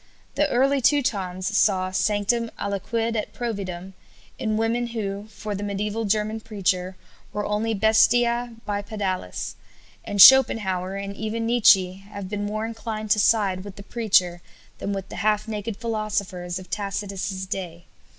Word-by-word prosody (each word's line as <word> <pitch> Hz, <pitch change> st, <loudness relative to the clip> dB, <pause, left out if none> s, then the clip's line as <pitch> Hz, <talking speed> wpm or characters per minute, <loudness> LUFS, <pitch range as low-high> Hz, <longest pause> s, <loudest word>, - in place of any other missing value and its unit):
The 295 Hz, 0 st, +1 dB
early 275 Hz, +2 st, +2 dB
Teutons 205 Hz, -8 st, 0 dB
saw 190 Hz, -3 st, +2 dB
"sanctum 205 Hz, +4 st, +1 dB
aliquid 225 Hz, +4 st, -2 dB
et 215 Hz, -, -3 dB
providum" 190 Hz, -6 st, -4 dB, 0.5 s
in 215 Hz, -2 st, -1 dB
women 230 Hz, +2 st, 0 dB
who, 205 Hz, -3 st, -4 dB
for 215 Hz, -1 st, -6 dB
the 200 Hz, -, -4 dB
mediæval 205 Hz, +2 st, -2 dB
German 215 Hz, +2 st, 0 dB
preacher, 190 Hz, -4 st, -1 dB, 0.4 s
were 210 Hz, -, -3 dB
only 215 Hz, +2 st, -1 dB
"bestiæ 235 Hz, +2 st, +3 dB
bipedales"; 205 Hz, -, -3 dB, 0.5 s
and 205 Hz, -, -4 dB
Schopenhauer 195 Hz, -6 st, +6 dB
and 200 Hz, 0 st, -5 dB
even 220 Hz, +2 st, -3 dB
Nietzsche 195 Hz, -5 st, +4 dB
have 200 Hz, -2 st, -7 dB
been 205 Hz, 0 st, -3 dB
more 215 Hz, +1 st, -2 dB
inclined 220 Hz, -1 st, -5 dB
to 215 Hz, -, +4 dB
side 200 Hz, -4 st, +2 dB
with 200 Hz, -1 st, -9 dB
the 200 Hz, -, -10 dB
preacher 185 Hz, -6 st, +1 dB, 0.4 s
than 200 Hz, -, -3 dB
with 195 Hz, -1 st, -4 dB
the -, -, -8 dB
half 215 Hz, +1 st, +1 dB
naked 210 Hz, -1 st, -4 dB
philosophers 210 Hz, -6 st, -3 dB
of 185 Hz, -1 st, -10 dB
Tacitus's 200 Hz, -1 st, -3 dB
day. 175 Hz, -3 st, -6 dB
210 Hz, 140 wpm, -24 LUFS, 195-225 Hz, 0.5 s, Schopenhauer